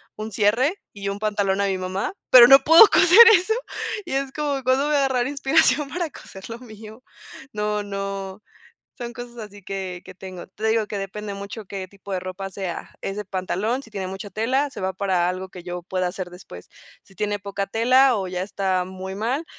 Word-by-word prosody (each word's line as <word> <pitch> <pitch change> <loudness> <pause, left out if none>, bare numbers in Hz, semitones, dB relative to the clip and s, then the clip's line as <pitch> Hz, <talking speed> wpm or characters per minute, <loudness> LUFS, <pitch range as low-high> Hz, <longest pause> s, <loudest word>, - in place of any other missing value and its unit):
un 215 +1 -6
cierre 225 - +2 0.2
y 200 -1 -5
un 200 +1 -4
pantalón 205 -2 0
a 200 - +1
mi 190 -1 -1
mamá, 185 - -3 0.2
pero 245 -2 +10
no 270 +1 +10
puedo 330 +8 +9
coser 365 +5 +5 0.2
eso, 370 +5 +1 0.5
y 345 - -5
es 270 0 -1
como, 285 -3 -2
¿cuándo 260 +3 +2
voy 300 - +1
a - - +3
agarrar 255 -2 0
inspiración 285 +1 +2
para 345 0 -3
coser 190 -5 -12
lo 230 - -6
mío? 220 0 -12 0.5
No 210 0 -1
no, 195 0 -5 0.6
son 240 0 -5
cosas 245 -1 -10
así 205 -2 -10
que 185 -2 -5
que 185 - -11
tengo. 185 -1 -9
Te 215 +3 -5
digo 220 -1 +1
que 205 - -4
depende 200 +1 -6
mucho 200 +2 -8
qué 190 -1 -6
tipo 200 +1 -11
de 185 - 0
ropa 185 +1 -6
sea. 185 -3 -6
¿Es 195 - -4
de 210 - -4
pantalón?, 195 +6 -2
si 225 - -16
tiene 195 -3 -4
mucha 195 +2 -7
tela, 260 +7 0
se - - -9
va 190 - -1
para 185 -3 0
algo 185 +1 -4
que 180 -2 -10
yo 180 -1 -5
pueda 185 -1 -1
hacer 180 -1 -6
después. 175 - -12 0.4
Si 195 - -21
tiene 205 +1 -1
poca 200 0 -4
tela 255 +4 +4
o 195 -2 -2
ya 180 0 -3
está 190 -2 -1
muy 190 +1 -7
mal, 250 +10 -2
205 Hz, 210 wpm, -23 LUFS, 190-245 Hz, 0.6 s, pero